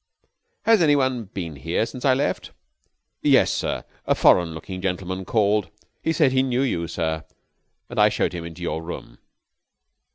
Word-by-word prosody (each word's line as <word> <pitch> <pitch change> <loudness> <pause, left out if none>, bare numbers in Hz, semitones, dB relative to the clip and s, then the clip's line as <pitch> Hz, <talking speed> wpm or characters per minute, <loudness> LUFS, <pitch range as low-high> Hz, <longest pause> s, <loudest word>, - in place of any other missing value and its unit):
_) - - -38 0.4
"Has 225 -4 +5
any 150 -3 +5
one 130 -4 0
been 85 -6 -6
here 85 +10 0
since 125 +2 -7
I 130 -2 +5
left?" 140 +2 -2 0.7
"Yes, - - +4
sir. - - -2 0.2
A - - +3
foreign 85 -3 +4
looking 95 +3 -7
gentleman 95 0 -3
called. 105 0 +2 0.3
He 160 - 0
said 155 -4 +3
he 130 0 +3
knew 130 0 +1
you, 85 -11 -1
sir. 80 -2 -2 0.6
I - - +3
showed - - 0
him 85 -1 -5
into 85 +1 -8
your 80 -1 -2
room." 85 +1 -8
95 Hz, 165 wpm, -23 LUFS, 85-130 Hz, 0.7 s, Has